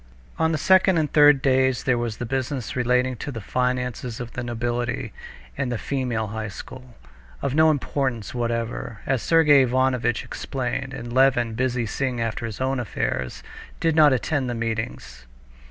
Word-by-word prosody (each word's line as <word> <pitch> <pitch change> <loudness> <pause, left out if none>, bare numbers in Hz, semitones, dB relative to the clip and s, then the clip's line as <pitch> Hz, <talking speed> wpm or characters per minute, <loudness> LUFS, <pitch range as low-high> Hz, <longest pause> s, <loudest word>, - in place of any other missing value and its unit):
On 160 0 +2
the 155 - 0
second 190 +2 +4
and 155 -2 0
third 145 -3 +6
days 130 -2 +2
there 130 - +2
was 120 -2 -3
business 130 +1 -3
relating 125 +1 +1
to 145 - -5
the 115 - -6
finances 125 +1 -2
of 120 -1 -6
the 125 - -5
nobility 120 -1 -3 0.4
and 125 - -2
the 120 - -1
female 120 -1 -2
high 110 +1 -4
school, 125 +4 -10 0.5
of 135 - 0
no 155 +2 +5
importance 130 -6 -1
whatever, 115 -3 -3
as 130 -3 0
Sergey 150 -4 +5
Ivanovitch 130 -2 +1
explained, 135 0 -4
and 120 -2 -7
Levin, 125 -3 +3
busy 125 0 0
seeing 125 +3 -2
after 115 +1 -2
his 110 - -7
own 130 0 0
affairs, 65 - -3 0.4
did 165 -1 +1
not 155 -2 +7
attend 130 +1 0
the 120 - -2
meetings. 110 - -4
125 Hz, 160 wpm, -24 LUFS, 115-135 Hz, 0.5 s, not